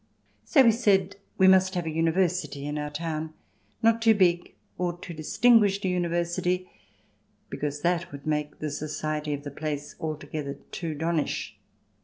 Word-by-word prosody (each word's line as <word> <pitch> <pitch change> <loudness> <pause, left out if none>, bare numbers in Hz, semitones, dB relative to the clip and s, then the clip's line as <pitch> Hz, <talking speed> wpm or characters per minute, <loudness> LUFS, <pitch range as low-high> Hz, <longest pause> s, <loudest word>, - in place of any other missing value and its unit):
So 275 -5 +5
we 230 - +6
said 200 -4 +2 0.2
we 190 - +6
must 190 0 +5
have 175 -2 -1
a 160 - -2
University 165 -3 0
in 150 +1 -3
our 150 0 -3
town 155 +1 -4 0.2
— - - -37
not 230 0 +4
too 225 -1 +5
big 175 -3 +2 0.2
or 175 -1 -1
too 175 0 -8
distinguished 200 +5 +3
a - - +2
Uni 180 -1 0
versity, 175 +2 -1 0.8
because 145 0 -3
that 175 0 0
would 140 -1 -10
make 150 -1 -2
the 155 -1 -4
society 155 0 -3
of 145 - -9
the 145 - -6
place 145 0 -4
too - - -25
altogether 150 -2 -4 0.2
donnish. 165 -1 -2
170 Hz, 165 wpm, -27 LUFS, 150-185 Hz, 0.8 s, we